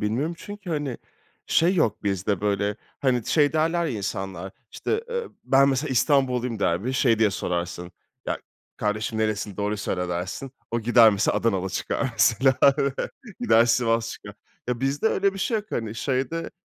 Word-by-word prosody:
bilmiyorum, 125 +11 -1
çünkü, 205 -3 -8
hani, 145 -5 -2 0.5
şey 175 +4 +3
yok 160 - +1
bizde, 100 0 -1
böyle, 105 0 0 0.2
hani, 125 -4 +1
şey 145 -2 +3
derler 165 +2 +1
ya 120 -8 -3
insanlar 95 -1 -4 0.2
işte, 445 +1 -2
ııı, 475 -1 -3
"Ben, 135 +1 +5
mesela, 140 +2 0
İstanbulluyum." 125 -4 +2
der 85 +1 0
ve 130 - -1
şey 120 -4 +3
diye 110 -2 +4
sorarsın, 90 -1 -3 0.3
"Ya - - -1 0.4
kardeşim 110 +1 -2
nerelisin 105 -2 -1
doğruyu 105 +1 -1
söyle." 90 -3 -2
dersin, 90 +10 -4 0.2
o 115 - -1
gider 115 0 +6
mesela 100 +1 +1
Adanalı 95 -5 0
çıkar 135 +7 -2
mesela, 125 +3 +3 0.8
gider 120 - +5
Sivas 115 -1 +2
çıkar. - - -10 0.3
Ya 120 -1 -1
bizde 135 +8 0
öyle 200 -2 +2
bir - - -7
şey 225 +4 0
yok, 210 -1 -4
hani, 115 -1 -3
şeyde 135 +6 -2
115 Hz, 160 wpm, -25 LUFS, 105-140 Hz, 0.8 s, gider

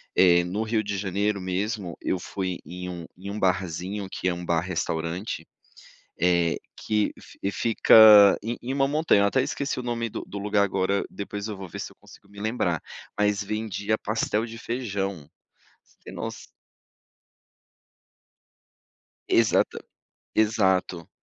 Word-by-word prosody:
eh, 85 -2 +6
no 90 +5 -3
Rio 110 -1 0
de 100 -1 -3
Janeiro, 100 +1 -1
mesmo, 95 0 -3
eu - - -1
fui 95 -1 -4
em 90 +1 -7
um 85 -2 -6
em 95 +2 -8
um 105 - -4
barzinho, 95 +2 -1
que - - -3
é - - 0
um 90 0 -6
bar 85 -1 +1
restaurante, 85 +1 -3 0.8
eh, 85 -1 +3 0.2
que 105 -1 0 0.4
fica 105 -2 +7
em 115 +2 -3
em 130 +2 -3
uma 135 0 +2
montanha, 150 -9 +3
até 130 +6 +2
esqueci 140 +1 -3
o - - -5
nome 120 -1 -2
do - - -6
do 100 - -8
lugar 100 0 +2
agora, 100 0 0
depois, 100 +1 -5
eu 105 - -5
vou 95 -1 -7
ver, - - -8
se - - -6
eu - - -21
consigo 100 - -18
me 100 0 -13
lembrar, 100 -7 -1 0.4
mas, 105 0 +1
vendia 110 0 -2
pastel 110 +1 -1
de 115 0 -9
feijão. 100 - -4 0.5
Se - - -15
nos - - -6 2.8
Exato, 115 -2 +3 0.6
exato. 95 -6 +1
100 Hz, 145 wpm, -25 LUFS, 90-110 Hz, 2.8 s, fica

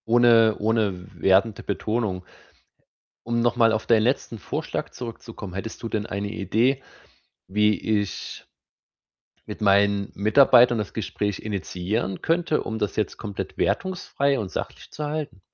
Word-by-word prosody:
Ohne 115 -2 +5
ohne 110 -1 +2
w 90 0 -12
wertende 100 +3 +3
Betonung. 105 -2 -2 1.0
Um 120 0 0
noch 120 0 +2
mal 115 -2 +4
auf 110 -1 -1
dein 115 -2 +4
letzten 115 -1 -1
Vorschlag - - -4
zurückzukommen: 115 -5 -8
Hättest 100 +6 -6
du 115 - -3
denn 105 -2 -2
eine 100 +1 -3
Idee, 115 +8 +1 0.7
wie 105 +2 +2 0.2
ich 100 - -6 1.0
mit - - -8
meinen 100 0 +3
Mitarbeitern 120 +3 +5
das 105 -2 -4
Gespräch 105 -2 -3
initiieren 95 -1 -3
könnte, 165 -2 +1
um 110 0 -4
das 105 - -2
jetzt 110 - -1
komplett 100 -3 -6
wertungsfrei 140 -7 0
und 100 -4 -4
sachlich - - -6
zu 150 - -5
halten? 145 -8 -4
110 Hz, 140 wpm, -24 LUFS, 100-120 Hz, 1.0 s, Ohne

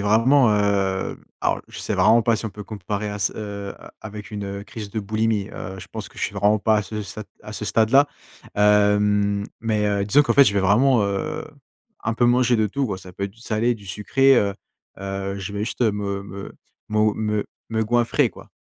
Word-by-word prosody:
vraiment, 115 +6 +4
heu 100 -2 0 0.2
alors - - 0
je - - -9
sais - - -2
vraiment 115 0 +5
pas 115 0 +2
si 110 - -4
on - - -5
peut 105 +1 -9
comparer 105 0 -4
à 105 - -4
ç 100 - 0
heu, 100 -2 -6 0.3
avec 105 -1 -8
une, 105 -1 -5
heu, 100 0 -5
crise 105 0 -8
de 110 - -2
boulimie. 110 0 0
Heu 95 - -7
je 90 - -11
pense - - -6
que - - -22
je - - -6
suis - - -1
vraiment 105 +1 +2
pas 110 0 +3
à 105 - +1
ce 105 +1 -5
sat 105 +2 -7 0.2
à 105 - -8
ce 105 - -5
stade 110 +2 +2
là. 140 +2 +6 0.5
Hem, 105 0 +3 0.2
mais, 110 -2 0
heu, 100 -1 +1
disons 135 +9 +5
qu'en - - 0
fait, 140 - +8
je 100 - +2
vais 100 - +3
vraiment, 115 +5 +4
heu, 100 -1 -2 0.6
un 115 - 0
peu 120 +1 +3
manger 125 0 +4
de 110 -2 +2
tout, 135 +5 -1
quoi. 100 -5 -3
Ça 90 -1 -12
peut 100 - -4
être 100 - -5
du 115 - -21
salé, 115 +1 0
du 105 -3 -13
sucré, 135 +8 +3
heu. 100 -3 +2 0.5
Heu, 95 0 -4
je 100 +1 -6
vais 105 +1 -2
juste 115 - -6
me 105 -3 0
me 100 0 -8 0.4
mo 105 0 +2
me 105 -1 -1 0.3
me 110 0 +1
goinfrer, 120 +1 +2
quoi. - - -14
105 Hz, 225 wpm, -23 LUFS, 100-110 Hz, 0.6 s, fait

